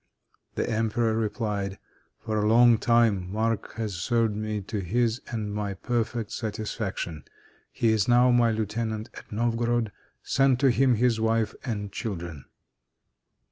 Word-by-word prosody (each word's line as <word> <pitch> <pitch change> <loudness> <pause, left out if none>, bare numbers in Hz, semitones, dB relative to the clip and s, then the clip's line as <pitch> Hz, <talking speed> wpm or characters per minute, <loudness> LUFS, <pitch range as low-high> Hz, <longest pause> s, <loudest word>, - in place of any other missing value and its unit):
The - - -1
emperor 110 0 +1
replied: 105 -3 -2 0.4
"For 110 -1 -2
a 105 - +1
long 115 0 +6
time 115 -6 +2
Marc 110 0 -1
has 110 -3 -3
served 115 +4 0
me 110 0 -3
to 105 +2 -4
his 115 +6 0
and 110 -3 -4
my 100 -1 -3
perfect 115 +1 -2
satisfaction. 105 - -4 0.5
He 115 - +1
is 110 -3 +2
now 125 +1 +5
my 120 -1 +4
lieutenant 110 0 -2
at - - -12
Novgorod. 115 0 0 0.3
Send 135 -2 +3
to 135 -2 +5
him 130 0 +3
his 115 0 +2
wife 110 0 +1
and 105 -6 -4
children." 85 - -5
110 Hz, 140 wpm, -26 LUFS, 105-120 Hz, 0.5 s, long